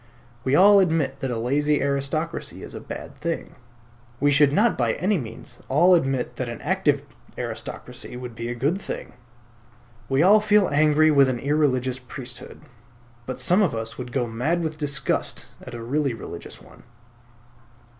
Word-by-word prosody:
We 130 +2 +2
all 200 +4 +7
admit 160 -7 +1
that 135 - -2
a 120 - -2
lazy 145 +5 +1
aristocracy 140 +4 -2
is - - -9
a - - -6
bad - - -8
thing. 165 +2 -3 0.7
We 145 0 +3
should 145 0 +5
not 210 +9 +3
by 120 -3 +1
any 195 +6 0
means 115 -4 -8
all 175 +7 +5
admit 135 -7 0
that 125 -2 -3
an 120 - -6
active 150 -4 +1 0.3
aristocracy 125 - -6
would 125 -1 -7
be 115 +1 -5
a 120 - -3
good 145 +11 0
thing. - - -6 1.0
We 135 +3 +3
all 205 +4 +7
feel 210 -2 +4
angry 155 +1 +4
with 140 -2 +5
an 125 - -1
irreligious 130 -2 +1
priesthood; 125 -1 -9 0.7
but 130 0 -4
some 180 +10 +3
of 185 - +1
us 115 +1 -5
would 125 -1 -6
go 125 0 0
mad 130 +10 -1
with 155 -1 -4
disgust 140 -3 -2 0.2
at - - -9
a 115 - -7
really 135 +1 0
religious 115 - -8
one. - - -17
140 Hz, 165 wpm, -24 LUFS, 125-160 Hz, 1.0 s, all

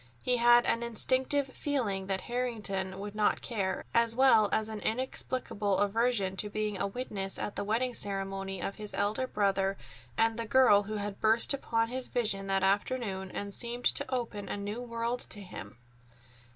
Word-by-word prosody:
He 250 -1 +2
had 240 0 +6
an 230 - +1
instinctive 260 +4 +1
feeling 230 -10 -2
that 190 -1 -1
Harrington 210 -6 -3
would 205 +1 -6
not 210 -1 +1
care, 195 -5 -2
as 230 -1 +3
well 240 -5 +5
as 220 0 +1
an 220 -1 -5
inexplicable 220 -4 -1
aversion 205 -2 +1
to 210 - +1
being 210 -2 -2
a - - +1
witness 195 -3 -3
at 205 - -4
the - - -2
wedding 235 +5 0
ceremony 195 -2 -3
of 195 - -4
his 210 -1 -5
elder 210 +6 0
brother 195 -3 +1 0.4
and 225 0 +2
the 230 - -3
girl 250 -5 +6
who 215 +1 -5
had 205 -1 -4
burst 220 +5 +4
upon 230 -4 0
his 255 +1 -3
vision 200 -5 0
that 195 0 +1
afternoon 195 -1 0
and 200 +1 -5
seemed 240 +2 -3
to - - +1
open 230 -5 -3
a - - -2
new 205 +4 -4
world 235 0 -2
to 205 - -1
him. 180 -9 -9
215 Hz, 175 wpm, -30 LUFS, 200-240 Hz, 0.4 s, had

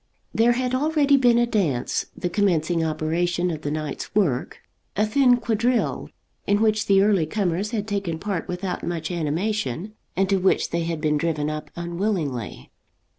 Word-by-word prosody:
There 235 +2 +4
had 250 +1 -1
already 290 +1 +3
been 245 -3 +4
a 240 - +4
dance, 170 - 0
the 180 - -2
commencing 175 -3 +1
operation 170 +3 0
of 155 -2 -5
the 145 - -3
night's 155 +2 -4
work, 165 -13 +1 0.4
a 210 - +2
thin 250 +2 +4
quadrille, 235 +1 0 0.4
in 205 +1 +3
which 215 -1 +2
the 195 -1 +5
early 200 -6 +3
comers 195 +1 -1
had 210 -2 -3
taken 195 -6 -2
part 195 -1 -3
without 180 +1 -4
much 170 0 -3
animation, 175 - -2 0.2
and 195 +1 +2
to 195 0 +2
which 190 0 +1
they 170 0 -1
had 165 -2 -3
been 150 -1 +1
driven 155 -2 -1
up 155 0 -6
unwillingly. 170 - -3
185 Hz, 165 wpm, -24 LUFS, 160-215 Hz, 0.4 s, the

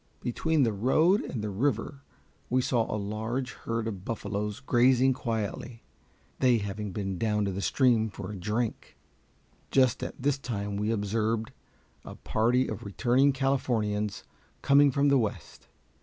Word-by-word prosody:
Between 155 +5 +1
the 115 -3 +1
road 155 - +3
and 115 -5 -5
the 105 - -3
river 135 +5 -1 0.5
we 130 - +2
saw 120 -3 +1
a 105 - -1
large 110 +5 -3
herd 115 -1 -4
of 100 -5 -5
buffaloes 105 0 -3
grazing 130 0 +3
quietly, 115 0 -4 0.6
they 125 -2 +4
having 100 0 -4
been 95 -2 -4
down 105 -2 +1
to 100 - -1
the 95 +1 -4
stream 115 -2 +2
for 100 -1 -7
a - - -6
drink. 105 +5 -3 0.7
Just 130 -3 +3
at - - -6
this 135 +1 0
time 105 -6 -4
we 105 +2 -1
observed 110 +1 -1 0.5
a - - -9
party 120 +4 +1
of 110 - -5
returning 125 +7 +2
Californians 115 -7 -1 0.4
coming 140 +1 +6
from 140 +2 +2
the 140 -1 +4
West. 110 -4 -5
115 Hz, 150 wpm, -28 LUFS, 105-130 Hz, 0.7 s, coming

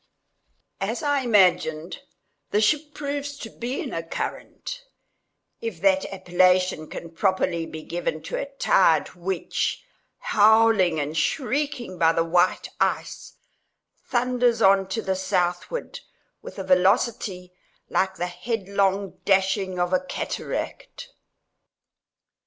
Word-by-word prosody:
As - - -3
I 285 -1 +2
imagined, 185 - +2 0.5
the 205 - +2
ship 295 +7 +1
proves 285 -1 -4
to 225 - -8
be 245 +3 -4
in - - -5
a 165 - -2
current—if 230 - -8
that 190 +1 +2
appellation 180 -3 +2
can 165 - -8
properly 175 -2 0
be 155 0 -8
given 175 +1 -3
to - - -5
a - - -3
tide - - +3
which, 180 - -2 0.3
howling 215 -5 +4
and 145 +2 -3
shrieking 255 - -1
by 165 0 +4
the 165 - +2
white 175 +2 +2
ice, - - -2 0.7
thunders 245 -1 +1
on 195 0 +4
to 190 +4 -3
the 190 - 0
southward 185 - -2 0.4
with - - -10
a 195 - -4
velocity 185 -1 +1 0.3
like 190 0 0
the 180 - -2
headlong 200 -1 -1
dashing 190 -1 +1
of 175 +1 0
a 185 - +4
cataract. 185 - -5
195 Hz, 115 wpm, -24 LUFS, 180-240 Hz, 0.7 s, howling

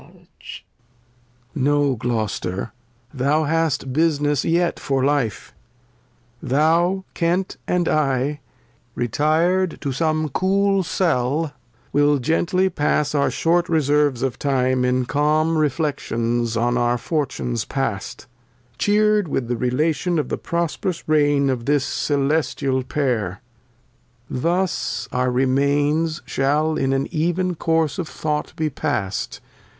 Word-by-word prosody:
Lear. - - -20 1.3
No, 145 -1 +2
Gloster, 110 -4 -2 0.4
thou 145 +4 +1
hast 155 -4 0
Business 150 -2 +1
yet 170 +1 +1
for 135 -1 0
Life; 135 -8 -1 0.9
Thou, 170 +7 +2
Kent, 175 +2 -1
and 180 -2 +1
I, 140 -1 +1 0.6
retir'd 160 +9 +1
to 140 - -2
some 155 +2 0
cool 195 +5 +2
CeU 160 -4 0 0.4
WiU 145 0 +3
gently 165 +7 +1
pass 150 -3 0
our 140 -1 +2
short 175 +2 +1
Reserves 145 -4 +2
of 130 -2 -2
Time 130 -2 +1
In 125 0 +1
calm 155 +4 +1
Reflections 120 -7 -1
on 120 +1 +1
our 120 0 +2
Fortunes 125 -5 -2
past, 120 -3 -4 0.5
Cheer'd 210 -1 +3
with 125 -4 -2
Relation 150 +8 0
of 150 - -1
the - - -2
prosperous 170 +1 -2
Reign 145 -2 +3
Of 125 -3 -1
this 145 -2 +2
celestial 140 -2 0
Pair; 125 -8 -1 0.9
thus 175 +7 -1
our 125 0 +1
Remains 145 +5 +1
Shall 150 +4 +1
in, 135 -2 0
an 135 0 +1
ev 165 +2 0
eh 185 - +1 0.2
"Course'^f°Though 160 -2 -1
j:^ - - -20
be 155 -1 -1
past. 100 -6 -3
145 Hz, 115 wpm, -21 LUFS, 130-165 Hz, 1.3 s, WiU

